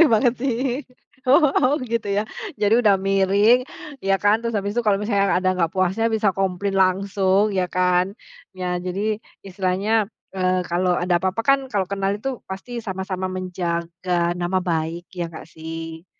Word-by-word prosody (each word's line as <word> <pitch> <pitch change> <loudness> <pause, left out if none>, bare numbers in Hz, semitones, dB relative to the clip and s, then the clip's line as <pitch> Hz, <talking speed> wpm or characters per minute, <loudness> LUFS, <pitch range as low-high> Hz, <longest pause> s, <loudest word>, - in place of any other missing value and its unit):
bener 330 - +8
banget 230 +2 +4
sih. 260 +1 -1 0.4
Oh, 275 -1 +4
gitu 230 -3 -2
ya. 200 +1 +1 0.3
Jadi 210 -3 +2
udah 205 -2 +5
miring 195 +6 +3 0.3
ya 195 -3 +1
kan, 205 +2 +4
terus 230 -1 -2
habis 205 0 -1
itu - - +2
kalau 205 - +5
misalnya 200 -2 +1
ada 185 0 +2
nggak 165 -2 +2
puasnya 190 +5 +1
bisa 215 -2 +2
komplain 195 +1 -1
langsung 195 +2 +2
ya 185 -2 0
kan. 180 +1 +1 0.4
Ya 180 -1 -2
jadi 200 +4 -2 0.3
istilahnya, 195 +3 0 0.3
eee, 185 -1 +1
kalau 180 +1 +2
ada 175 0 +1
apa-apa 190 +5 -1
kan 275 0 +5
kalau 200 -3 0
kenal 195 0 0
itu 250 +4 -4
pasti 195 +6 -6
sama-sama 190 -3 -4
menjaga 175 -1 -2
nama 175 +2 0
baik 170 0 -2
ya 175 -2 -2
nggak 160 - -10
sih? 165 +1 -7
195 Hz, 160 wpm, -22 LUFS, 180-210 Hz, 0.4 s, bener